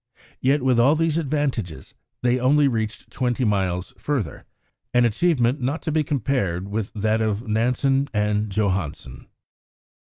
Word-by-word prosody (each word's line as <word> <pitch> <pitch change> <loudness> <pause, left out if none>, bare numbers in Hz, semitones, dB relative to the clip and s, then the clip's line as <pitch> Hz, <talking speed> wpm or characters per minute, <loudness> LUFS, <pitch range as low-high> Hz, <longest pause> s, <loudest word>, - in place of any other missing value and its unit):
Yet 135 +1 +2
with 130 -2 +3
all 135 +6 +5
these 165 0 +1
advantages 135 - -2 0.3
they 125 +1 +2
only 140 +3 +4
reached 110 -3 -3
twenty 125 0 -1
miles 95 -4 -1
further, 125 - -3 0.5
an 125 0 +5
achievement 130 +1 +1
not 140 +6 -2
to 160 - -2
be 155 0 +2
compared 110 - -1
with 105 0 -3
that 110 +1 +1
of 110 +2 -1
Nansen 125 +5 +1
and 105 0 0
Johansen. 95 - -2
120 Hz, 135 wpm, -23 LUFS, 105-140 Hz, 0.5 s, all